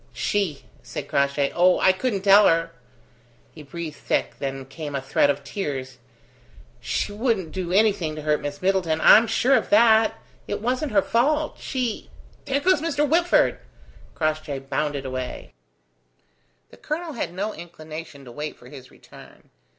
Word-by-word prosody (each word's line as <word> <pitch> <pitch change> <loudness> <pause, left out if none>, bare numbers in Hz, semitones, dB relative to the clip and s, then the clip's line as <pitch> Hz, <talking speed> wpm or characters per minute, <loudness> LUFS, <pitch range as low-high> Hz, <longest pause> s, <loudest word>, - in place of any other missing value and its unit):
"She!" 195 -9 -1 0.2
said - - -7
Crossjay. 140 0 +1
"Oh, 180 +1 +4
I 190 - +5
couldn't 195 0 -2
tell 200 +1 +7
her." 165 0 +1 0.8
He 155 - -11
breathed 155 +1 -7
thick; - - -1
then 135 -1 -4
came 145 +1 -7
a - - 0
threat 135 +1 +1
of 145 0 -1
tears. 135 -6 -5 0.8
"She - - -2
wouldn't 205 -6 -1
do 185 -2 -4
anything 195 -6 +2
to 155 - -7
hurt 150 0 +1
Miss 145 +3 -6
Middleton. 185 -4 +1
I'm 220 +7 +7
sure 240 +4 +2
of 260 - +2
that. 225 -7 +5 0.3
It 205 - -3
wasn't 255 +6 -1
her 200 -2 +3
fault. 295 +6 0
She 250 -4 -3 0.4
There 275 +1 0
goes 365 -2 +3
Mr. 295 -2 0
Whitford!" 345 +4 +3 0.6
Crossjay 155 -3 -2
bounded 145 -1 -2
away. 130 -1 -6 1.2
The - - -15
colonel 320 +1 -4
had 235 - -4
no 200 +4 -3
inclination 155 -4 -10
to 120 - -11
wait 150 +4 -6
for 125 - -15
his 130 -2 -12
return. - - -17
175 Hz, 155 wpm, -23 LUFS, 145-225 Hz, 1.2 s, tell